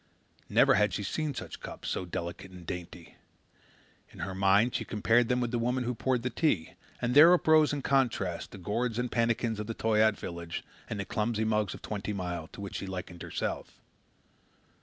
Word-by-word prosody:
Never - - +5
had 105 +1 +3
she 105 - -3
seen 150 +7 -2
such - - -7
cups, - - -8
so 95 - -2
delicate 85 +2 -5
and 90 -2 -12
dainty. 90 -1 -7 0.9
In - - -16
her 95 +2 -3
mind 100 +5 +3
she - - -1
compared 115 +2 +2
them 125 0 +2
with 120 -1 -1
the 120 - 0
woman 125 +2 0
who 125 +1 -1
poured 125 +1 0
the 125 - -1
tea, 105 - 0 0.3
and 125 0 0
there 155 +5 +9
uprose 155 -3 +4
in 145 -2 -3
contrast 115 -10 +1
the - - -10
gourds 110 +5 -2
and 125 0 -1
pannikins 115 -1 +1
of 105 - -4
the 115 - -4
Toyaat 110 -1 +3
village 85 -1 -6 0.3
and 105 - -3
the 100 - -2
clumsy 110 0 -1
mugs 105 -2 0
of - - -13
Twenty 105 0 -3
Mile, 90 -4 -4
to - - -11
which 100 - -5
she 100 - -5
likened 90 -2 -6
herself. - - -4
110 Hz, 195 wpm, -30 LUFS, 95-125 Hz, 0.9 s, there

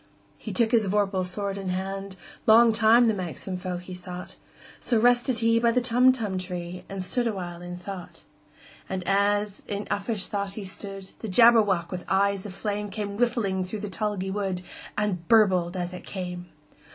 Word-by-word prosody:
He - - -7
took 230 -2 +3
his 225 -4 +3
vorpal 195 -1 +1
sword 200 +2 -3
in 190 -1 -4
hand:Long 195 +4 +2
time 220 +2 +5
the 225 - +3
manxome 185 0 -5
foe 180 -1 -3
he 180 +1 -9
sought—So 180 +5 -5
rested 245 0 +3
he 230 0 +4
by 235 0 +3
the 250 - +2
Tumtum 245 -5 +2
tree, 180 -1 -6
And 195 -1 -4
stood 240 +6 0
awhile 175 -5 -4
in 175 0 -7
thought. 180 0 -8 0.7
And 185 -2 -4
as 205 +1 +1
in 205 0 -3
uffish 205 0 -1
thought 200 -1 -3
he 205 -1 -6
stood, 195 0 -7
The 220 - -5
Jabberwock, 205 -5 +5
with 180 -1 -4
eyes 200 +1 +1
of 190 - -8
flame, 205 0 -3
Came 200 0 -4
whiffling 215 -5 0
through 195 +3 -5
the 210 -2 -5
tulgey 200 -2 -2
wood, 190 -3 -2 0.3
And 190 -5 -1
burbled 190 -5 +4
as 180 0 -3
it 180 - -8
came! 180 -2 -6
195 Hz, 170 wpm, -26 LUFS, 185-220 Hz, 0.7 s, time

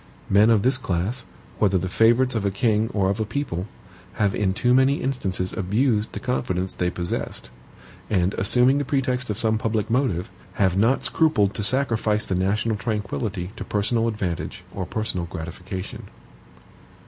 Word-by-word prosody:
Men 105 +3 +6
of 110 -3 +4
this 130 +1 +2
class, 105 +5 -2 0.3
whether 100 -3 +3
the 95 - -2
favorites 120 +6 +3
of 110 -3 -1
a 100 - +2
king 110 +2 +1
or 95 -2 +1
of 100 - -3
a - - +2
people, 105 -6 -3 0.5
have 100 -1 +1
in 100 -3 +1
too 120 +5 +2
many 130 +2 +4
instances 95 -10 -2
abused 110 +3 0
the - - -4
confidence 95 -7 -2
they 90 - 0
possessed; 85 -8 -3 0.6
and 95 -1 +1
assuming 125 +7 +4
the - - 0
pretext 130 -2 -1
of 105 - -2
some 110 -1 +1
public 110 -1 -1
motive, 115 -7 0 0.2
have 95 -2 +2
not 115 +7 +2
scrupled 105 -12 +2
to - - -3
sacrifice 110 -3 +1
the - - -1
national 105 +4 0
tranquillity 100 -3 -3
to - - -4
personal 115 +3 0
advantage 95 -4 -3
or 95 -2 -4
personal 100 -6 -2
gratification. 90 +3 -7
105 Hz, 160 wpm, -24 LUFS, 95-120 Hz, 0.6 s, Men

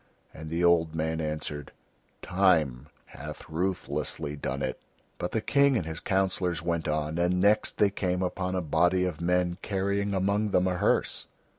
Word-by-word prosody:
And 80 0 -8
the 85 +2 -1
old 85 -2 +3
man 80 0 -1
answered: 75 -2 -4 0.5
"Time 80 -9 +2 0.2
hath - - -9
ruthlessly 85 -3 -2
done 70 - -3
it." - - -3 0.4
But 90 - -2
the 110 - 0
King 140 +1 +3
and 85 - -2
his 80 0 -5
councillors 95 -3 0
went 85 -1 -1
on, 75 +1 -1
and 90 +1 +2
next 105 +3 +2
they 100 -1 +4
came 90 -2 -1
upon 90 0 -2
a 90 - 0
body 90 +3 +2
of 85 -3 -4
men 90 +1 +1
carrying 100 0 -1
among 100 +3 +1
them 90 -2 +2
a 95 - +1
hearse. - - +1
90 Hz, 165 wpm, -28 LUFS, 80-95 Hz, 0.5 s, they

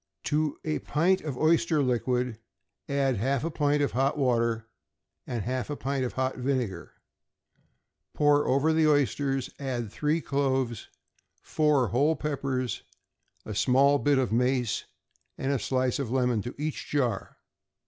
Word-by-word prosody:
To 150 0 0
a 155 -1 -1
pint 175 +5 +1
of 145 -5 -5
oyster 160 -1 +3
liquor, 125 -1 0 0.5
add 140 -3 +1
half 130 +5 0
a 165 - -2
pint 145 -1 +1
of 140 - 0
hot 135 +4 +1
water 115 -4 +1 0.6
and 120 -5 -3
half 130 +4 -3
a 145 - -2
pint 135 -1 -2
of 125 - -3
hot 130 0 -1
vinegar; 125 -6 -2 1.2
pour 145 0 +3
over 140 +4 +3
the 160 -1 +3
oysters; 140 -2 +1
add 125 -6 -3
three 150 +6 0
cloves, 135 -6 -1 0.5
four 150 -6 +2
whole 145 +6 +2
peppers, 135 -5 -2 0.6
a 110 - -5
small 135 +6 +4
bit 145 -1 +2
of 130 -3 0
mace, 125 0 +1 0.5
and 135 - -1
a 140 - +1
slice 130 +3 0
of 135 -5 -2
lemon, 125 -3 +1
to 120 - -7
each 150 +1 -4
jar. 125 -8 -1
135 Hz, 145 wpm, -28 LUFS, 125-145 Hz, 1.2 s, small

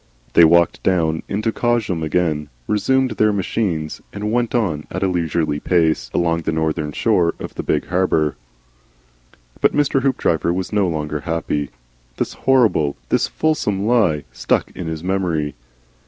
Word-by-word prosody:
They 85 - +7
walked 85 +1 +3
down 80 -4 +1
into 105 +3 -1
Cosham 110 -8 0
again, 80 -2 0 0.2
resumed 130 - +1
their 110 0 +2
machines, 90 -5 -2
and 105 +1 -3
went 120 0 0
on 85 -11 -1
at 95 +2 -3
a - - +3
leisurely 85 -4 -1
pace 80 -1 +1
along 85 -1 +1
the - - -2
northern 80 -1 -1
shore 90 -1 +1
of - - -7
the - - -4
big 75 - 0
harbour. 85 -5 +1 1.3
But - - +4
Mr. 145 -2 +2
Hoopdriver 85 - +1
was 90 +3 -3
no 100 -3 +2
longer 75 -2 -2
happy. 75 -3 -2 0.5
This - - -2
horrible, 115 - +2
this - - +2
fulsome 105 -11 0
lie, 105 -11 +2
stuck - - 0
in 85 - -6
his 80 0 -5
memory. 85 -6 -1
90 Hz, 150 wpm, -20 LUFS, 80-105 Hz, 1.3 s, They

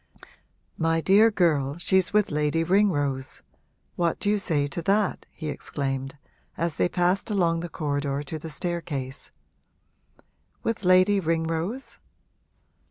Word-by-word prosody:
'My 165 0 +2
dear 200 +6 +5
girl, 155 -8 +1
she's 185 +1 +2
with 210 -3 +2
Lady 150 +2 +1
Ringrose 145 -8 +1 0.5
what 170 -2 0
do 205 - +1
you 210 - +1
say 155 -7 0
to 145 +4 -4
that?' 200 +3 0
he 155 - -7
exclaimed, 135 -2 -4 0.4
as 170 -1 -2
they - - +2
passed 180 +5 +1
along 170 -5 +1
the 175 +1 -5
corridor 145 -2 -2
to 155 +2 -6
the 160 - -7
staircase. 150 -5 -4 1.3
'With 230 -2 -2
Lady 185 +2 +5
Ringrose?' 165 +7 -2
165 Hz, 125 wpm, -26 LUFS, 145-190 Hz, 1.3 s, dear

